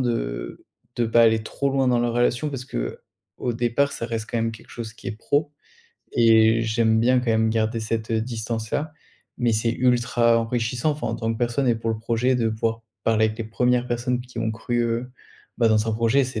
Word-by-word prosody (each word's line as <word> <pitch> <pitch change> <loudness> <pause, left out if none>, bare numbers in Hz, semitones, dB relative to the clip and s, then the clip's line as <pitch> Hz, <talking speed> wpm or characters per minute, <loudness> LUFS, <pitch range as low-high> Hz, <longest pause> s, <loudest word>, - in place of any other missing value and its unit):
de - - -3 0.3
de 120 -1 +1
pas 115 +1 +5
aller 110 -1 +3
trop 140 +4 -2
loin 135 -1 +1
dans 125 -1 +3
la 120 0 +1
relation 120 +4 +1
parce 130 -3 -5
qu'au - - -6
départ, 120 +4 +1
ça 115 - -4
reste 115 -1 -4
quand 120 - -1
même 115 0 0
quelque 115 - -13
chose 115 -2 -7
qui - - -13
est - - -2
pro 145 +5 0 0.6
et 115 0 +5
j'aime 110 0 +2
bien 125 +2 +4
quand 125 - -3
même 110 0 +2
garder 110 +1 0
cette 110 +1 -3
distance-là. 115 +5 -2 0.4
Mais, 120 -2 +1
c'est 115 +2 +1
ultra 120 -1 +3
enrichissant, 120 +4 -1
enfin 150 - -4
en 115 - -2
tant 115 0 -1
que - - -5
personne 120 +3 0
et 120 - +4
pour 115 0 -2
le 110 - -2
projet 120 +3 +1
de 115 -2 +1
pouvoir 115 +1 -2 0.2
parler 110 -1 +3
avec 110 0 -4
les 115 - -1
1res 125 +2 +1
personnes 120 +1 -1
qui 125 -1 -10
ont 115 -1 0
cru, 120 +2 -2
heu, 120 +2 -2 0.5
bah 115 - +4
dans 110 0 +2
un 110 - +1
projet, 115 +5 +2
c'est 120 -3 -4
115 Hz, 210 wpm, -23 LUFS, 110-125 Hz, 0.6 s, pas